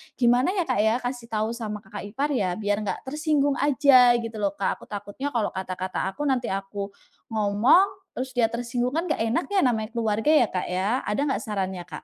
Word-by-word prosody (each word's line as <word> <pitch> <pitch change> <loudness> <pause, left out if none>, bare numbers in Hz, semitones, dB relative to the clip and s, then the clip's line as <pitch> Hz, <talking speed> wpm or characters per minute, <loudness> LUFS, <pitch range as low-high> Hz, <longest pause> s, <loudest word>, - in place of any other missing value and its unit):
gimana 245 +6 +3
ya 365 - +1
Kak 255 -8 -1
ya, 220 +2 +3
kasih 245 -1 -4
tahu 220 +1 -1
sama 215 -3 -5
kakak 205 - -8
ipar 275 +8 -2
ya, 185 -9 0
biar 205 0 -1
nggak - - -3
tersinggung 295 -1 +1
aja 260 -3 +6
gitu 230 -1 -5
loh 200 -1 -1
Kak. - - -1
Aku - - -14
takutnya 205 +6 -5
kalau 215 -3 +1
kata-kata 185 0 -3
aku 290 - -5
nanti 255 -3 +1
aku 195 +1 -4 0.4
ngomong, 220 - +4 0.3
terus 260 +1 -4
dia 230 - +4
tersinggung 245 +2 -2
kan 335 - 0
nggak - - 0
enak 330 +10 0
ya 395 - +3
namanya 220 -3 0
keluarga 225 +4 +1
ya 295 -7 +5
Kak 185 - -2
ya, 200 +8 0
ada 210 +7 -1
nggak - - -1
sarannya 190 -5 -3
Kak? - - -8
230 Hz, 205 wpm, -25 LUFS, 205-260 Hz, 0.4 s, aja